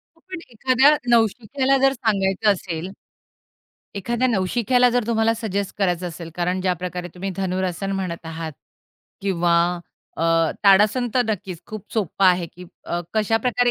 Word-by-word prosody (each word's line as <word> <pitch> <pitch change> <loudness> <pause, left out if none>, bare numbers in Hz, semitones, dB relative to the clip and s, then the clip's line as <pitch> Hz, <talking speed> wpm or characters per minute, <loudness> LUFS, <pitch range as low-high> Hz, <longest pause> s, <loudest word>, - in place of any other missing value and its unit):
हो, - - -28
पण 370 - -6
एखाद्या 260 +5 +4
नवशिक्याला 245 +4 +2
जर 270 0 +4
सांगायचं 210 -4 +1
असेल, 180 -2 -4 1.1
एखाद्या 235 +5 -1
नवशिक्याला 240 +4 +2
जर 245 -2 0
तुम्हाला 225 -1 +2
सजेस्ट 200 -3 -3
करायचं 180 -2 0
असेल, 165 0 -9
कारण 180 +1 -1
ज्या 185 -1 +1
प्रकारे 180 0 -4
तुम्ही 190 +2 -4
धनुरासन 185 0 -2
म्हणत 180 -3 -4
आहात 160 0 -5 0.7
किंवा 175 -3 +1 0.7
अ, - - 0 0.4
ताडासन, 210 +5 +5
तर 250 - +4
नक्कीच 195 -5 -4
खूप 215 -3 -8
सोप्पं 200 -2 0
आहे 180 -1 +3
की 180 - -12 0.5
कशा 220 +1 +2
प्रकारे 245 -1 +2
200 Hz, 140 wpm, -22 LUFS, 180-235 Hz, 1.1 s, ताडासन